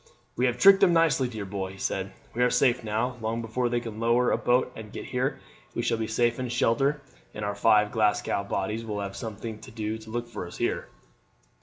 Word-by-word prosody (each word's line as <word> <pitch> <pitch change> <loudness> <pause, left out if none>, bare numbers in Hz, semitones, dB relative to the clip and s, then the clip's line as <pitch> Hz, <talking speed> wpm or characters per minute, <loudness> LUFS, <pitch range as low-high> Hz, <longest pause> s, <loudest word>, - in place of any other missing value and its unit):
"We 125 - +2
have 125 -1 -1
tricked 195 0 +8
them 175 - +5
nicely, 165 -6 +3
dear 110 -4 -6
boy," 95 -1 -4
he - - -13
said; 95 0 -2 0.2
"we 120 - -2
are 125 - +5
safe 125 -1 +2
now. 115 +4 -1
Long 110 +1 -1
before 115 +2 -1
they 120 0 +1
can 115 -2 -7
lower 120 +2 +3
a - - +4
boat 125 +1 +2
and 110 -1 -9
get - - -7
here - - -1 0.4
we - - -1
shall 115 - 0
be 110 - -1
safe 120 +2 +1
in 125 -1 -2
shelter, 135 +5 +1 0.3
and 105 - -3
our 100 - -1
five 105 0 +4
Glasgow 105 -2 +1
bodies 105 +3 -2
will 105 -2 -4
have 100 -1 -5
something 110 0 -6
to - - -12
do 110 0 -4
to 110 0 -13
look 120 +1 -3
for 115 -6 -6
us - - -10
here." - - -1
115 Hz, 225 wpm, -27 LUFS, 105-125 Hz, 0.4 s, tricked